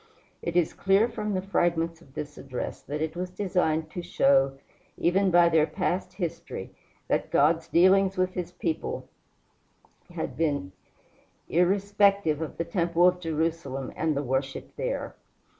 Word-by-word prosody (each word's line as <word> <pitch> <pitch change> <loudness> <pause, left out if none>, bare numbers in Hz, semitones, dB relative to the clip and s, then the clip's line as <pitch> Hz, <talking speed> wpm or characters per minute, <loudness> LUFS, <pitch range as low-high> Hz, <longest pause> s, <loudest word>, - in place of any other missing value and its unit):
It 170 - -4
is 175 -3 +2
clear 195 +4 +3
from 210 -3 -3
the 185 - -1
fragment 170 -3 0
of 135 -5 -20
this 150 0 -5
address 130 -2 -5
that 150 +3 -3
it 160 0 -3
was 180 +1 -3
designed 180 -5 0
to 175 - -4
show, 135 -6 +3 0.4
even 190 +3 +2
by 175 -1 +6
their 160 -2 +3
past 180 -1 -2
history, 175 -4 -5 0.4
that - - 0
God's 160 +3 +3
dealings 190 +2 +4
with 185 0 +1
his 180 -2 -4
people 165 -2 -3 1.0
had - - -5
been 145 -12 -1 0.8
irrespective 195 -2 +2
of 160 - -5
the 170 - -1
temple 170 0 +2
of 180 0 +2
Jerusalem 160 -5 -2
and 155 -2 0
the 140 - -1
worship 135 +1 -3
there. - - -3
170 Hz, 145 wpm, -27 LUFS, 155-185 Hz, 1.0 s, by